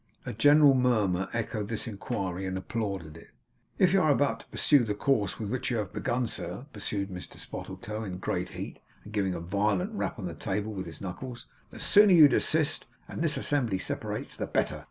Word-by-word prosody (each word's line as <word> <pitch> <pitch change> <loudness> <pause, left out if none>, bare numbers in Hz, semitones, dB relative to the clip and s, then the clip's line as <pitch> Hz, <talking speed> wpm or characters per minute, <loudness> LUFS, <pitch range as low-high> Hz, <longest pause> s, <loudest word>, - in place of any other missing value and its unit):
A - - -4
general 145 +5 +6
murmur 105 -8 +2
echoed 110 -2 -3
this 115 -2 -3
inquiry, 95 -4 -3
and 95 0 -2
applauded 95 -6 -4
it. - - -14 0.5
'If 185 -1 +4
you 195 - +5
are 155 - +3
about 145 0 +2
to - - -15
pursue 145 -5 +3
the 105 -2 -1
course 105 -4 +1
with 105 -3 -4
which 130 +1 -2
you 120 - 0
have 105 -4 -3
begun, 125 +1 0
sir,' 120 +3 -5
pursued 100 -1 -3
Mr 90 -1 -8
Spottletoe 110 +1 -6
in 95 -4 -5
a - - -5
great 90 -1 -2
heat, - - -7 0.2
and 105 - -11
giving 95 -3 0
a - - -3
violent 105 - 0
rap 205 - -2
on 100 - -5
the 85 - -4
table 105 +5 -3
with 95 -3 -5
his 80 -3 -10
knuckles, 120 +6 -6 0.2
'the - - -11
sooner 205 -1 +6
you 160 -4 +10
desist, 155 +1 +1 0.2
and - - -5
this 160 -3 +1
assembly 125 -9 0
separates, 95 - -4
the - - -3
better. - - 0
110 Hz, 205 wpm, -29 LUFS, 95-135 Hz, 0.5 s, you